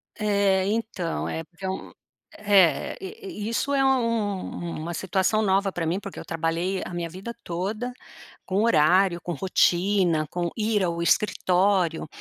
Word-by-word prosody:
É 200 -3 +2
então, 210 -5 -2
é 160 - -3
porque 175 +3 -11
é - - -1
um, 190 - -5 0.5
é 200 -5 +3
i 385 - -7
i - - -2
isso 270 +5 -1
é 275 -1 +3
um 225 -9 -1
uma 170 +2 -4
situação 190 +4 +1
nova 195 -1 +2
pra 175 -2 -3
mim 170 +4 0
porque 195 -1 -8
eu - - -8
trabalhei 165 +3 -1
a - - -7
minha 170 -1 -3
vida 190 +7 -7
toda, 205 +8 -3 0.5
com 195 +3 +1
horário, 180 -2 +4
com 175 - -4
rotina, 180 -1 +2
com 175 +1 -2
ir 215 -2 +1
ao 170 -1 -1
escritório, 185 -2 +2
190 Hz, 155 wpm, -25 LUFS, 175-210 Hz, 0.5 s, horário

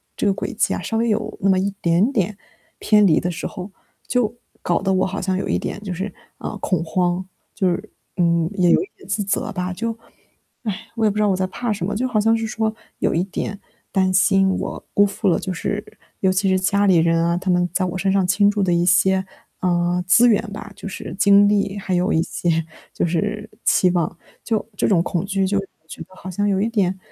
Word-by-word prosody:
这 - - -2
个 200 - +3
轨 - - -4
迹 215 - +1
啊， - - -3
稍 225 - -2
微 230 +1 +1
有 215 0 -1
那 195 - +2
么 185 - +4
一 195 +2 0
点 170 +7 +3
点 200 -2 0 0.4
偏 210 -1 +4
离 165 -5 +4
的 175 - -2
时 170 - -5
候， 185 +2 -7 0.4
就 235 -3 +1 0.3
搞 175 - 0
得 195 -1 +1
我 185 - +2
好 195 +2 -3
像 185 0 0
有 195 - -3
一 - - +1
点 200 - -5
就 190 -3 -4
是， 190 +2 -4 0.2
呃， 210 - -5
恐 185 -4 0
慌， 175 +2 0 0.3
就 190 -3 +1
是， 190 +5 -3 0.3
嗯， 170 -1 +2
也 180 -3 +3
有 - - +5
一 380 - -6
点 - - -16
自 205 +2 0
责 200 +2 -1
吧， 180 -1 -3
就 230 +4 -3 0.7
唉， 210 -5 -4
我 225 -2 +1
也 - - +5
不 - - -8
知 - - +2
道 210 - +3
我 190 - +2
在 185 - 0
怕 230 +4 -2
什 200 -3 -3
么， 205 - -2
就 250 +5 0
好 250 -4 -1
像 225 +2 +3
是 225 0 -2
说 220 0 -1 0.3
有 - - +1
一 170 - +1
点 200 +1 -4 0.3
担 190 -1 +2
心 195 +1 +4
我 190 - -3
辜 205 - +5
负 200 0 -2
了， 180 - +4
就 190 - -4
是 205 +4 -3 0.4
尤 190 -1 +3
其 195 +1 +1
是 190 - +3
家 200 +2 +2
里 185 - +5
人 165 0 +3
啊， 170 0 +1
他 185 0 -1
们 180 0 +2
在 195 - +1
我 180 0 -3
身 195 +1 0
上 195 -1 +2
倾 200 +2 +4
注 205 -1 0
的 185 - +1
一 170 0 +2
些， 190 +2 +3 0.4
呃， 175 0 +1
资 240 +6 +6
源 215 - +3
吧， 210 0 -8
就 - - -7
是 185 - -7
精 200 0 +6
力， 205 -1 +1
还 190 -1 -3
有 180 +3 +1
一 160 - +3
些 165 -2 -1 0.3
就 - - 0
是 210 +5 -2 0.2
期 185 - +4
望， 170 -1 -1 0.3
就 220 -2 0
这 - - +1
种 175 -5 +3
恐 175 +1 -2
惧， 195 -1 0
就 200 +1 +1
我 175 -4 -11
觉 - - -9
得 185 +3 -19
好 185 - -9
像 205 +3 0
有 195 -1 +1
一 220 - +1
点 190 -5 0
195 Hz, 260 characters per minute, -21 LUFS, 180-205 Hz, 0.7 s, 资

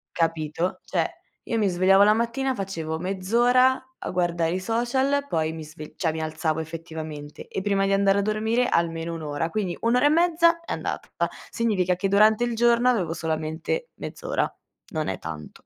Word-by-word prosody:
capito? 165 +1 -1
Cioè, - - 0 0.4
io 230 - -2
mi 210 -2 +2
svegliavo 190 +2 +5
la 210 +1 +6
mattina, 235 +4 0
facevo: 165 -6 -3
mezz'ora, 240 +8 +3 0.2
a - - -4
guardare 175 -2 0
i 185 - -1
social, 260 +7 0
poi 160 - 0
mi 160 -1 -7
sve 155 0 -10
cioè 165 -4 0
mi 160 0 -4
alzavo, 155 0 -1
effettivamente, 160 -2 -7
e 190 - -4
prima 195 -1 +1
di 195 - +1
andare 195 0 +3
a - - +2
dormire 220 +4 +1
almeno 165 0 0
1 165 - -6
ora, 150 +2 -2
quindi 195 -4 -2
1 230 +1 +2
ora 250 +3 +3
e - - +6
mezza, 335 +1 +4
è - - -8
andata. - - -4 0.4
Significa 190 -6 +1
che 185 +2 -1
durante 215 +3 +4
il 240 -1 -1
giorno, 235 +1 +4
avevo 180 -10 +1
solamente 160 - -3
mezz'ora. - - -3 0.4
Non 155 -1 -2
è 95 - -3
tanto. 80 -2 -8
190 Hz, 180 wpm, -25 LUFS, 160-235 Hz, 0.4 s, la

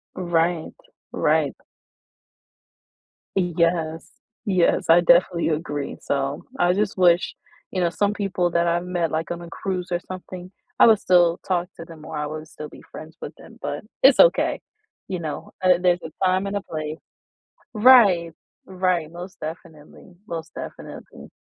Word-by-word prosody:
Right, 170 -2 0 0.4
right. - - +1 1.8
Yes. 170 -3 0 0.4
Yes, 185 -4 +2
I 170 +1 +7
definitely 175 0 +3
agree, 150 -2 -3
so 140 0 -2 0.2
I 175 +1 +3
just 205 0 -1
wish 175 -1 +3 0.4
you 185 - -2
know, 175 - +2
some 205 +4 0
people 185 -4 -1
that 170 0 +1
I 170 +1 +2
met 175 -2 -2
like 160 +2 -2
on 175 - -4
a 170 - -9
cruise 185 0 -4
or 175 - 0
something, 185 0 -8 0.3
I - - +8
would 220 -2 +5
still 175 -3 +3
talk 180 -1 0
to - - -7
them 165 -2 -13
or - - -7
I 150 0 -2
would 155 +1 -7
still 150 -1 -9
be - - -14
friends 160 +2 -11
with - - -7
them, - - -15
but - - -4 0.2
it's - - +7
okay. - - +4 0.5
You 185 -2 -3
know, 155 -3 -6
uh, 185 - +3
there's 180 -1 +3
a 160 - -7
time 185 +1 +2
and 200 - -4
a 200 - -1
place. 155 -3 -6 0.7
Right. 210 -8 +6 0.3
Right, 185 -4 -1
most 180 +3 -9
definitely, 160 +1 -10
most 165 -2 -6
definitely. - - -10
175 Hz, 155 wpm, -23 LUFS, 165-185 Hz, 1.8 s, I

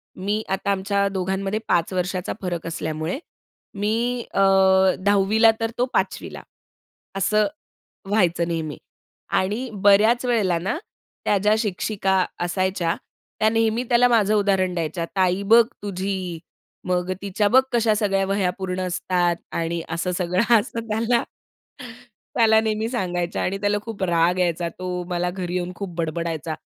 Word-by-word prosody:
मी 205 +3 -2
आता 195 +1 0
आमच्या 200 +1 0
दोघांमध्ये 195 +2 -2
5 175 +2 +1
वर्षाचा 180 0 -2
फरक 175 -3 -3
असल्यामुळे 160 - -3 0.6
मी 235 +3 0
अ, - - 0 0.6
10वी 200 +2 +2
ला 225 -1 +8
तर 225 0 -1
तो 245 - +2
5वी - - -1
ला, - - -8 0.7
असं 210 +2 +2 0.6
व्हायचं 175 -5 +2
नेहमी 160 -4 -3 0.6
आणि 215 +7 -2
बऱ्याच 215 +5 +5
वेळेला 210 -8 +2
ना, 190 - -2 0.5
त्या 205 - +3
ज्या 210 +2 +3
शिक्षिका 195 -2 0 0.2
असायच्या, 175 -1 0 0.4
त्या 215 - +4
नेहमी 225 +1 +1
त्याला 245 +1 +5
माझं 215 -4 +3
उदाहरण 195 -3 +2
द्यायच्या, 165 0 -2
"ताई 185 0 +2
बघ 230 +3 +7 0.2
तुझी, 190 -3 -3 0.5
मग 180 0 0
तिच्या 200 +1 0
बघ 260 +2 +7
कशा 230 -2 +3
सगळ्या 195 -2 +1
वह्या 195 -2 0
पूर्ण 185 -1 -3
असतात." 175 -1 0 0.2
आणि 165 0 -2
असं 170 +2 -2
सगळं 185 +6 +2
असं 230 +1 -5
त्याला 230 +2 +1 1.1
त्याला 220 -2 +5
नेहमी 220 0 -1
सांगायच्या 180 -7 -2
आणि 195 +2 -1
त्याला 205 0 +1
खूप 220 -4 -5
राग 175 0 +2
यायचा. 170 -1 0
तो 180 +1 -5
मला 180 0 -1
घरी 180 -1 -4
येऊन 180 0 -2
खूप 185 -2 -6
बडबडायचा, 165 -1 -3
190 Hz, 140 wpm, -23 LUFS, 180-215 Hz, 1.1 s, ला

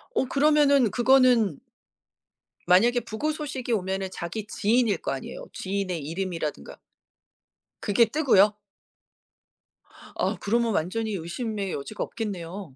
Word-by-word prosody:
어 - - +2
그러면은 280 -4 +4
그거는 245 - +4 1.1
만약에 235 +8 +4
부고 235 +7 -3
소식이 285 -5 -5
오면은 190 -1 -2
자기 185 +5 -5
지인일 215 -1 +1
거 - - -4
아니에요. 135 - -6
지인의 190 -3 -3
이름이라든가 165 - -4 1.0
그게 210 +3 +4
뜨고요? 220 -6 +4 1.6
아 - - -1
그러면 230 +1 +1
완전히 215 +7 -1
의심의 195 +2 -4
여지가 145 +10 -4
없겠네요. 185 - -6
210 Hz, 280 characters per minute, -26 LUFS, 185-245 Hz, 1.6 s, 그러면은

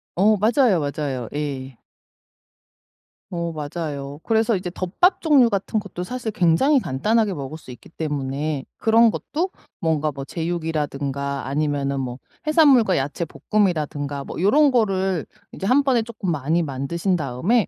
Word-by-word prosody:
어. 210 +4 +4
맞아요, 220 - +3
맞아요. 140 -4 -3
예. 135 -4 -4 1.5
어 170 -1 -2
맞아요. 145 -2 -5
그래서 225 -1 +2
이제 180 -1 -4
덮밥 205 - +1
종류 275 -8 +5
같은 200 +2 0
것도 180 -3 -6
사실 240 +1 -4
굉장히 205 - +3
간단하게 210 - +1
먹을 145 +3 -6
수 130 - -16
있기 120 - -11
때문에 145 -2 -3
그런 225 0 +5
것도 355 +5 -3 0.3
뭔가 155 -2 0
뭐 135 0 -7
제육이라든가 145 -4 -3
아니면은 140 -1 -1
뭐 125 -1 -4 0.3
해산물과 275 - +5
야채 145 +5 -2
볶음이라든가 150 -7 -1
뭐 - - -6
요런 280 +8 +5
거를 190 - +1 0.2
이제 195 - -5
1 275 +4 +4
번에 255 -4 +3
쪼끔 220 -5 -4
많이 160 +3 0
만드신 160 +7 -1
다음에 165 - +1
170 Hz, 310 characters per minute, -22 LUFS, 145-220 Hz, 1.5 s, 종류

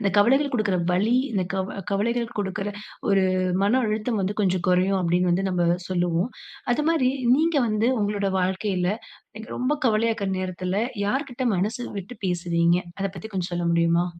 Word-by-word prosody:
அந்த 200 -2 +1
கவலைகள் 270 +7 +4
குடுக்குற 210 -5 +1
வலி, 210 +7 +2 0.2
இந்த 190 -4 0
கவ 190 +1 -3
கவலைகள் 230 +4 0
குடுக்குற 195 0 -2 0.4
ஒரு 195 -1 +4 0.4
மன 225 +6 +3
அழுத்தம் 215 +1 -1
வந்து 200 +3 -2
கொஞ்சம் 185 -2 +1
குறையும், 185 +2 +3
அப்படீன்னு 180 +1 +2
வந்து 190 +2 +1
நம்ப 175 -2 +1 0.2
சொல்லுவோம். 175 +3 0 0.4
அதுமாரி 300 -1 +2 0.3
நீங்க 320 +1 +2
வந்து 215 +2 +1
உங்களோட 205 -1 0
வாழ்க்கையில, 185 0 0 0.5
எனக்கு 220 +2 -8
ரொம்ப 255 +4 +1
கவலையாக்குற 220 -3 +1
நேரத்துல 185 0 -3 0.3
யார்க்கிட்ட 260 +2 -2
மனசு 215 +7 -1 0.2
விட்டு 195 +6 -8
பேசுவீங்க? 170 -1 +2 0.2
அத 195 - 0
பத்தி 180 +5 -7
கொஞ்சம் 180 -1 -2
சொல்ல 175 0 -1
முடியுமா? 170 +1 +3
195 Hz, 150 wpm, -24 LUFS, 180-225 Hz, 0.5 s, கவலைகள்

